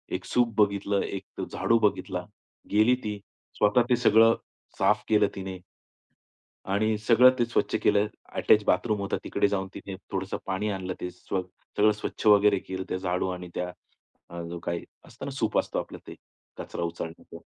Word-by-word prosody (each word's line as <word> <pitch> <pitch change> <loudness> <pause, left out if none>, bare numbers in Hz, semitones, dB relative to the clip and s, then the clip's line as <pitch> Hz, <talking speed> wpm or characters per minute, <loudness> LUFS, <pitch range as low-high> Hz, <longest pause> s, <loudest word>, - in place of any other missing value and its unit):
एक - - -5
सूप 120 -2 +1
बघितलं, 100 -1 +2
एक 95 -1 -6
झाडू 115 - +2
बघितला, 105 -2 0 0.5
गेली 110 +4 +5
ती 105 -1 -3 0.4
स्वतः 105 +4 +4
ते 125 - +5
सगळं 115 -1 +5 0.4
साफ 105 0 +3
केलं 105 -1 +4
तिने. 95 -1 -5 1.1
आणि 110 +2 +2
सगळं 115 +4 +6
ते 120 - +3
स्वच्छ 120 - 0
केलं. 105 +1 +3 0.3
अटॅच 105 - +4
बाथरूम 105 +3 +1
होतं. 100 - -1
तिकडे - - +1
जाऊन 95 -1 -1
तिने 95 -1 -7 0.2
थोडंसं 95 0 -2
पाणी 105 +3 -1
आणलं, 95 -1 -3
ते 90 - -3
स्व 90 +1 -3 0.4
सगळं 105 +1 +5
स्वच्छ 105 +1 -5
वगैरे 105 -1 +6
केलं 95 0 -5
त्या 95 - -1
झाडू 90 0 -1
आणि 90 -1 -5
त्या, 90 0 -2 0.8
जो 85 0 -5
काही 85 0 -3 0.2
असतं - - -10
ना, - - -4
सूप - - -1
असतं - - 0
आपलं - - -7
ते - - -8 0.4
कचरा 85 - -5
उचलण्याचा, 85 -1 -6
100 Hz, 165 wpm, -27 LUFS, 95-110 Hz, 1.1 s, सगळं